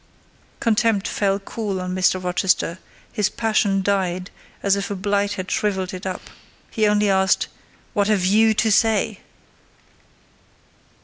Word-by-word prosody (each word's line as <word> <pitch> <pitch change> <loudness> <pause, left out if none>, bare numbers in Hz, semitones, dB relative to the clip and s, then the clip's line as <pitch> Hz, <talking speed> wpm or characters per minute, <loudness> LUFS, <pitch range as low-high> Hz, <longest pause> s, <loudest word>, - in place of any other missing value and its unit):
Contempt 225 -2 +1
fell 195 -1 0
cool 200 -1 -4
on 185 0 -4
Mr. 185 0 +1
Rochester—his 180 +2 -1
passion 210 -3 +1
died 185 -2 -1 0.3
as 200 -1 +3
if 200 0 -3
a 200 - -3
blight 200 +1 0
had 185 -2 -5
shrivelled 190 -3 -1
it 185 +1 -6
up: 185 - -6 0.4
he 215 -2 +2
only 210 0 +2
asked—"What 190 +2 -1
have 205 -4 +2
you 220 +3 +4
to 220 +1 +2
say?" 220 +1 +2
200 Hz, 125 wpm, -22 LUFS, 185-210 Hz, 0.4 s, you